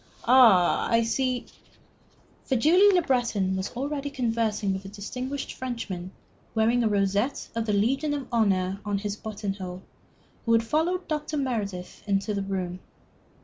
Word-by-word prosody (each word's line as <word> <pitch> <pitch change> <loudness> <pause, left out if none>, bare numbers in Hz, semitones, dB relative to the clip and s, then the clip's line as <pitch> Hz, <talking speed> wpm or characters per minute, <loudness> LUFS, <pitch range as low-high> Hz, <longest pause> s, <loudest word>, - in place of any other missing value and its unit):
Ah, 230 -8 +6
I 230 0 +3
see 255 +2 -1 0.5
" - - -33
For 265 - 0
Julie 355 - +6
Le 360 -3 +3
Breton 225 -9 +1
was 190 0 -2
already 285 +2 -3
conversing 225 -6 0
with 190 - -4
the 195 - -9
distinguished 250 +7 -5
Frenchman 230 -8 -5 0.5
wearing 225 +2 +3
the 230 -2 +2
rosette 200 +6 0
of 230 0 -2
the 210 - +1
Legion 270 +9 +1
of 275 -3 -5
Honor 195 -4 +1
in 205 -1 -1
his 205 0 -3
button 210 -2 -4
hole, 185 -2 -7 0.6
who 230 - +4
had 230 0 +4
followed 335 +9 0
Dr. 300 -1 -2
Meredith 210 -9 -3
into 200 +1 0
the 200 - -1
room. 185 -2 -3
225 Hz, 155 wpm, -26 LUFS, 200-260 Hz, 0.6 s, Ah